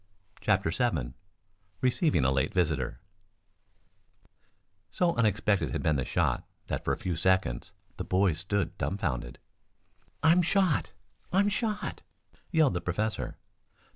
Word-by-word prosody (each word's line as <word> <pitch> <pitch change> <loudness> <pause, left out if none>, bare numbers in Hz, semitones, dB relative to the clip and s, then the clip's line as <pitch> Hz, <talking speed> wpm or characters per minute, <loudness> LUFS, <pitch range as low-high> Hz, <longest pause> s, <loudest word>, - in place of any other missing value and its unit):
CHAPTER 80 - +2
VII 80 - 0 0.7
RECEIVING 130 - +2
A 65 - +4
LATE 65 0 0
VISITOR - - 0 1.9
So 175 -2 +1
unexpected 105 - +2
had - - -3
been 75 -2 +2
the 65 - 0
shot - - 0 0.2
that, - - -3
for - - 0
a - - 0
few 90 -2 -2
seconds, 80 -9 +1 0.3
the - - -3
boys 95 -3 +2
stood 100 +2 -1
dumbfounded. 65 -10 -2 0.9
"I'm 165 +3 +6
shot! 180 - +2 0.4
I'm 200 +3 +3
shot!" 210 0 -2 0.5
yelled 155 - +3
the 85 - -2
professor. 90 - -2
100 Hz, 120 wpm, -29 LUFS, -, 1.9 s, I'm